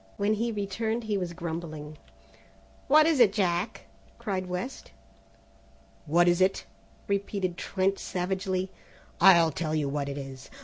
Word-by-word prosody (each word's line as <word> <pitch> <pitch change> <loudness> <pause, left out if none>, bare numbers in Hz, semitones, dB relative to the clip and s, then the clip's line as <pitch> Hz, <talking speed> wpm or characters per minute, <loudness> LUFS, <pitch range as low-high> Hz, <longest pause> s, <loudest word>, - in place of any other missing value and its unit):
When 205 +1 +2
he 230 +2 -1
returned 220 +3 -2
he 215 -2 -1
was 180 -3 -2
grumbling. 160 -3 -6 0.9
"What 305 +2 +6
is 320 -4 +2
it, 230 -5 +7
Jack?" 190 +1 -1 0.3
cried 185 -3 -3
West. 180 +9 -5 1.2
"What 175 +3 +4
is 175 +1 +3
it?" 190 +1 +2 0.4
repeated 200 -2 -1
Trent 195 +2 -1
savagely; 185 0 -2 0.5
"I'll 170 -3 +7
tell 155 +1 -2
you 150 -2 0
what 140 0 -2
it 140 - -5
is. 135 -1 -8
185 Hz, 135 wpm, -28 LUFS, 170-200 Hz, 1.2 s, it